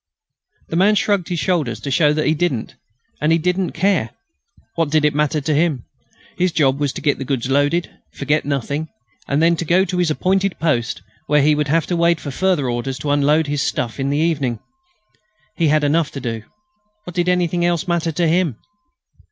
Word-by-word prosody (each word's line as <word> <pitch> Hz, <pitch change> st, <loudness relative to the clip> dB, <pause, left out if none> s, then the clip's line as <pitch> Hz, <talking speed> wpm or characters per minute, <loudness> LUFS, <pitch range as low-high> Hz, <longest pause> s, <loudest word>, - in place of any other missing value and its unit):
The -, -, -3 dB
man 200 Hz, +5 st, +4 dB
shrugged 200 Hz, -4 st, +1 dB
his 175 Hz, -, -2 dB
shoulders 145 Hz, -, -1 dB
to 140 Hz, -, -4 dB
show 150 Hz, +1 st, +4 dB
that 155 Hz, +1 st, 0 dB
he 155 Hz, -, +3 dB
didn't, 150 Hz, -8 st, -2 dB, 0.5 s
and 150 Hz, -, +2 dB
that -, -, +5 dB
he -, -, +2 dB
didn't 180 Hz, +2 st, -1 dB
care. 190 Hz, -, +1 dB, 0.6 s
What 165 Hz, -3 st, 0 dB
did 155 Hz, 0 st, +2 dB
it 150 Hz, -, +2 dB
matter 150 Hz, +1 st, +1 dB
to 150 Hz, +2 st, -1 dB
him? 150 Hz, -5 st, 0 dB, 0.5 s
His 180 Hz, 0 st, +1 dB
job 140 Hz, -4 st, +2 dB
was 145 Hz, -2 st, 0 dB
to -, -, -6 dB
get 145 Hz, -1 st, +1 dB
the -, -, -3 dB
goods 130 Hz, -1 st, -2 dB
loaded, 145 Hz, +5 st, +1 dB, 0.2 s
forget 155 Hz, +1 st, 0 dB
nothing, 140 Hz, +3 st, -3 dB, 0.4 s
and 145 Hz, +3 st, +1 dB
then 170 Hz, +1 st, +4 dB
to -, -, -2 dB
go 180 Hz, +4 st, +3 dB
to 180 Hz, 0 st, -3 dB
his 175 Hz, -2 st, +2 dB
appointed 190 Hz, +4 st, 0 dB
post 120 Hz, -, -1 dB, 0.2 s
where 150 Hz, -1 st, +3 dB
he 150 Hz, +1 st, +4 dB
would 150 Hz, -1 st, 0 dB
have 160 Hz, +3 st, +1 dB
to 175 Hz, -, -2 dB
wait 170 Hz, -1 st, +2 dB
for 145 Hz, -, -6 dB
further 175 Hz, -2 st, 0 dB
orders 120 Hz, +2 st, -3 dB
to 145 Hz, +1 st, -2 dB
unload 145 Hz, +2 st, +3 dB
his 145 Hz, -1 st, -2 dB
stuff 120 Hz, -3 st, -2 dB
in 135 Hz, 0 st, -1 dB
the 145 Hz, -, 0 dB
evening. 145 Hz, -7 st, 0 dB, 1.0 s
He 165 Hz, -, +1 dB
had 150 Hz, 0 st, +2 dB
enough 150 Hz, +2 st, +2 dB
to 140 Hz, -, -5 dB
do. 115 Hz, -4 st, -5 dB, 0.6 s
What 180 Hz, -4 st, -9 dB
did 175 Hz, 0 st, +1 dB
anything 175 Hz, -1 st, +1 dB
else 175 Hz, +1 st, 0 dB
matter 170 Hz, -1 st, 0 dB
to 170 Hz, +2 st, 0 dB
him? 165 Hz, -5 st, +1 dB
155 Hz, 210 wpm, -19 LUFS, 140-170 Hz, 1.0 s, that